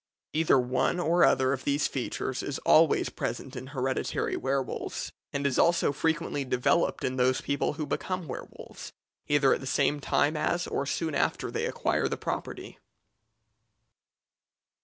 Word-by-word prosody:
Either 160 -3 +4
one 130 +7 +1
or 175 +1 +3
other 130 0 +4
of 130 - -4
these 145 +1 +1
features 130 0 -3
is 140 - -3
always 160 0 +5
present 125 +3 -5
in 130 +1 -6
hereditary 130 -1 -1
werwolves, 135 -1 -2 0.2
and 140 0 -2
is 140 -2 +1
also 170 -3 +4
frequently 160 0 -1
developed 135 +5 +1
in 130 0 -1
those 130 +1 +3
people 140 0 -1
who 155 0 -4
become 185 +2 -3
werwolves, 130 - -9 0.3
either 145 -2 +4
at - - -1
the 135 - -7
same 145 +2 +1
time 145 +2 +1
as 175 +3 0
or 140 - -2
soon 160 +1 -1
after - - 0
they - - -1
acquire - - 0
the - - -3
property. - - -5
140 Hz, 150 wpm, -28 LUFS, 130-155 Hz, 0.3 s, always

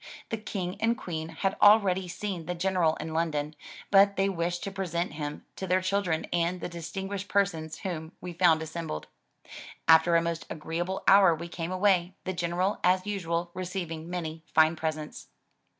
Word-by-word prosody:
The 225 - -2
King 195 -3 -4
and 230 +1 +2
Queen 160 -2 -5
had 190 +4 -1
already 200 -3 +5
seen 175 -1 -5
the 180 - -2
General 175 -3 +2
in 160 +1 -6
London, 155 -2 -1 0.4
but 200 0 +6
they 195 +1 +2
wished 175 -1 -2
to 195 - -4
present 175 -4 -2
him 150 -1 -5
to 190 - -4
their 185 +1 +3
children 185 -4 0
and 175 +1 +1
the - - -4
distinguished 190 +4 -5
persons 165 -7 0
whom 165 -3 -5
we 180 -1 -7
found 165 -2 +4
assembled. 160 - -5 0.8
After 165 +1 +6
a 165 - +5
most 170 -1 -3
agreeable 170 +4 -3
hour 190 -4 +7
we 170 +2 -7
came 170 0 -5
away, 185 -1 +2
the 185 - -3
General 180 +3 -1
as 185 +1 +3
usual 175 -4 -2
receiving 175 -3 -5
many 165 -3 -4
fine 160 +1 +5
presents. 155 -1 -4
175 Hz, 165 wpm, -28 LUFS, 165-190 Hz, 0.8 s, hour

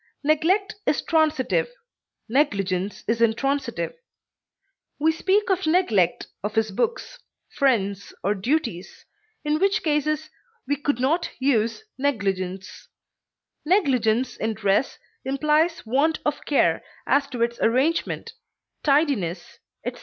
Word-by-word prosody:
Neglect 365 +8 +2
is - - +1
transitive, 315 - +2 0.6
negligence 200 -7 0
is 230 +1 0
intransitive; 275 - 0 1.0
we 315 +2 +3
speak 385 +6 +1
of 375 -3 0
neglect 225 - +2 0.2
of 210 +1 -3
his 220 -1 +1
books, 475 - -2 0.3
friends, 200 -8 0
or 200 - +2
duties, 220 - -2 0.4
in 300 +1 +1
which 395 +3 +2
cases 305 0 0 0.4
we 285 - +1
could 285 -2 -1
not 320 +7 +1
use 240 - +1 0.2
negligence; 195 -8 -2 0.8
negligence 255 - +2
in 220 0 -2
dress 205 +4 +1 0.3
implies 300 +5 +1
want 285 +8 +2
of 295 -1 -2
care 290 - +2 0.2
as 280 0 +2
to 240 -2 -2
its 235 0 -2
arrangement, 265 +8 0 0.5
tidiness, 275 - 0 0.3
etc. - - -4
275 Hz, 110 wpm, -24 LUFS, 220-315 Hz, 1.0 s, we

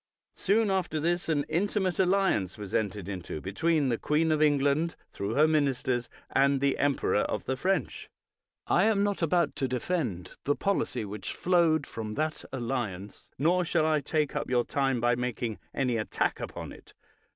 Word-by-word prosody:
Soon 210 +1 +2
after 180 -5 0
this 175 +2 0
an 145 -3 +1
intimate 190 +1 0
alliance 190 - +2
was 100 -3 -8
entered 100 -3 -1
into 90 -5 -5
between 145 - +1
the 115 - 0
queen 160 +2 +1
of 155 -1 +1
England, 145 +2 +2 0.2
through 100 +3 -3
her 150 +2 +5
ministers, 130 -5 0 0.2
and 140 0 +3
the 140 0 +1
emperor 140 -6 +2
of - - -1
the 130 - -1
French. 190 +8 -1 0.6
I - - +3
am 215 -2 +3
not 205 -2 -1
about 170 +1 +2
to 135 - 0
defend 125 - -2
the 145 - +1
policy 195 - -1
which 105 +1 -5
flowed 170 -4 +2
from 110 -1 -6
that 155 0 -2
alliance, 115 -7 -4
nor 175 +6 +3
shall 165 -2 +1
I 155 -2 +2
take 150 +1 -1
up 145 - -2
your 125 -1 +2
time 135 -3 0
by 120 +1 +3
making 120 -2 -3
any 125 -3 0
attack 110 - -1
upon - - -6
it. - - -15
145 Hz, 170 wpm, -28 LUFS, 120-170 Hz, 0.6 s, her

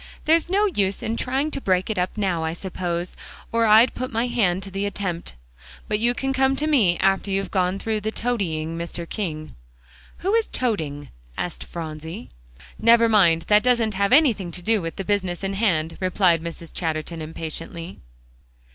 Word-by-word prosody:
There's 325 +2 +3
no 400 +3 +3
use 200 - 0
in 225 0 -1
trying 270 +6 -1
to 275 - -4
break 185 -3 +1
it 210 - -2
up 180 +3 -2
now, 185 -6 0
I 160 0 -1
suppose, 175 -1 -4 0.4
or 230 0 +2
I'd 220 +4 +6
put 255 +1 -4
my 230 +1 0
hand 195 -7 +1
to 195 - -9
the 195 +2 -2
attempt. 180 - -3 0.5
But 210 - 0
you 240 +2 +2
can 270 +1 -1
come 265 0 +2
to 295 - 0
me 225 - +3
after 195 +1 +1
you've 195 0 -1
got 185 0 +1
through 220 0 -2
toadying 195 -8 -2
Mr. 170 0 -5
King." 155 -7 -4 0.7
"What 395 +4 +2
is 450 - -3
toding?" 155 - -2 0.3
asked 175 - -4
Phronsie. 160 +4 -7 0.5
"Never 230 0 +6
mind; 175 -7 +4
that 210 +3 +4
hasn't 225 -5 +2
anything 210 - +3
to 180 - -4
do 220 0 +2
with 165 -1 -5
the 195 - -5
business 190 -3 -1
in 195 0 -1
hand," 175 -6 0
replied 185 -3 +2
Mrs. 170 0 -8
Chatterton 160 0 -3
impatiently. 165 +2 -6
195 Hz, 175 wpm, -23 LUFS, 170-230 Hz, 0.7 s, I'd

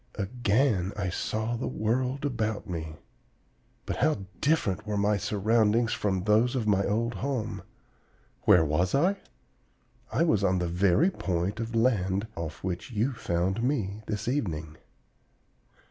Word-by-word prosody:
Again 105 -2 +1
I 100 -3 -1
saw 110 +5 -2
the 120 - -3
world 130 +6 -1
about 110 -5 -2
me. 80 -3 -5 0.9
But - - -3
how 150 -11 +1
different 110 - +1
were 105 -1 -1
my 105 +1 +2
surroundings 110 +3 +2
from 95 -3 -1
those 110 +5 +3
of 120 -4 -1
my 100 -2 +3
old 115 +3 0
home! 115 +1 -3 0.8
Where 80 -2 +6
was 85 +5 +1
I? 180 +8 +3 0.9
I - - +2
was 110 - +2
on 95 -1 +3
the 90 -1 -1
very 95 - +3
point 95 - -2
of 115 0 -4
land 100 -4 +2
off 80 -2 -6
which 90 +3 -3
you 120 +4 0
found 95 0 -1
me 110 -6 -1
this 105 +1 -3
evening. 80 - -2
105 Hz, 140 wpm, -28 LUFS, 95-120 Hz, 0.9 s, Where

